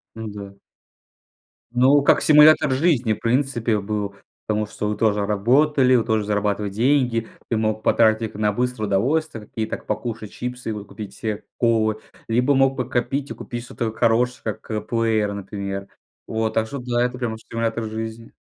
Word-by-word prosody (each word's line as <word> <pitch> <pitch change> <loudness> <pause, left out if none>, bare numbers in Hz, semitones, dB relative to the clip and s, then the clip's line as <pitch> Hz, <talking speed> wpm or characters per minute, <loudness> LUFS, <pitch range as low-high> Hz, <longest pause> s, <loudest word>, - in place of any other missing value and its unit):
Ну 110 -1 -6
да. 100 -1 -8 1.2
Ну, 135 +4 +5
как - - +4
симулятор 150 -1 +6
жизни, 130 -7 +2
в - - -7
принципе, 120 -3 +1
был, 100 -1 -3 0.3
потому 105 0 0
что 105 0 -4
вы 105 - -2
тоже 105 -2 +2
работали, 130 +6 +3
вы 115 - +3
тоже 110 -2 0
зарабатывать 105 -1 -1
деньги. 120 -1 +1 0.2
Ты 115 - +1
мог 110 0 0
потратить 110 -1 +3
их - - -15
на 105 0 +1
быстрое 125 -1 -2
удовольствие, 115 +3 0
такие 110 0 -4
как - - -6
покушать 110 -1 -4
чипсы, 125 -1 -5
и - - 0
вот 105 -1 -7
купить 105 -3 -8
себе 110 -1 -4
колы, 110 -2 +1 0.3
либо 125 +5 +2
мог 135 0 +3
подкопить 130 +2 -2
и - - -2
купить 120 -1 -7
что-то 115 -2 -4
хорошее, 120 +3 +1 0.2
как 105 -1 -5
плеер, 110 -3 +1
например. 100 0 -5 0.4
Вот. 110 0 -1
Так 110 0 +1
что 140 +3 -6
да, 120 -1 0
это 125 0 -3
прям 115 -3 -3
стимулятор 115 0 -3
жизни. 110 +1 -6
115 Hz, 170 wpm, -22 LUFS, 105-125 Hz, 1.2 s, симулятор